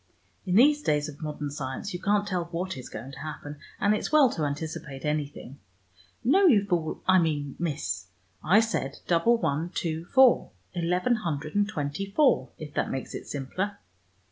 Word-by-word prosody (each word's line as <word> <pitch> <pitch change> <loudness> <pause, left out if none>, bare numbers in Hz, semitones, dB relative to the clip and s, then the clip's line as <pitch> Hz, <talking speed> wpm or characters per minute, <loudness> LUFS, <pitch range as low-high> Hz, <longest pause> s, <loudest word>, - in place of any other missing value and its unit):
"In 180 - +1
these 290 +6 +6
days 150 - +1
of 145 0 -10
modern 150 -2 -4
science 140 +6 -5
you 175 - -4
can't 205 0 +2
tell 180 -3 -1
what 175 +2 -4
is 130 - -8
going 115 +5 -7
to 135 - -10
happen, 150 -1 -7 0.2
and 205 +1 +3
it's 215 - -2
well 295 -5 +6
to 155 - -3
anticipate 150 -1 -5
anything. 145 -2 -3 0.6
No, 370 +11 +5
you 210 - +5
fool, 170 -5 -1
I 185 0 +6
mean 145 -4 -1
Miss, 100 - -2 0.4
I 195 +8 +5
said 185 -12 -2
double 180 +8 +3
one 160 -3 -1
two 165 -1 -2
four, 260 +4 +5 0.2
eleven 180 +7 +1
hundred 155 -6 -3
and 205 0 +2
twenty 150 +1 -3
four, 265 +8 +3
if 150 -2 -8
that - - 0
makes 135 - -4
it - - -7
simpler. 185 +9 -3
165 Hz, 175 wpm, -27 LUFS, 145-205 Hz, 0.6 s, these